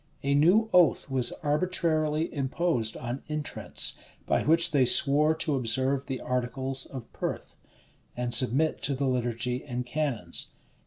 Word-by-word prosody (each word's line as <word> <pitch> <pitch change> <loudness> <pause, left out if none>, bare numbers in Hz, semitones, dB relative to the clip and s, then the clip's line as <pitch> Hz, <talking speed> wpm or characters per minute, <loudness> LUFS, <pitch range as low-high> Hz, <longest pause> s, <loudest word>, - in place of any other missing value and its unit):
[] - - -33
A 140 0 +1
new 180 +10 +4
oath 175 -5 +3
was 125 -2 0
arbitrarily 155 0 0
imposed 135 -4 -1
on 125 +2 -5
intrants, 150 -1 0 0.3
by - - +1
which 165 +2 +3
they 140 -3 +3
swore 145 +5 +4
to 160 -1 -1
observe 130 +3 0
the 135 -2 -4
articles 130 +2 -3
of 130 -4 -10
Perth, - - -5 0.6
and 120 -1 -2
submit 135 +5 +2
to 140 - 0
the 140 +1 -2
liturgy 125 -1 -2
and 125 -2 -5
canons. 125 - -1
135 Hz, 145 wpm, -27 LUFS, 125-155 Hz, 0.6 s, new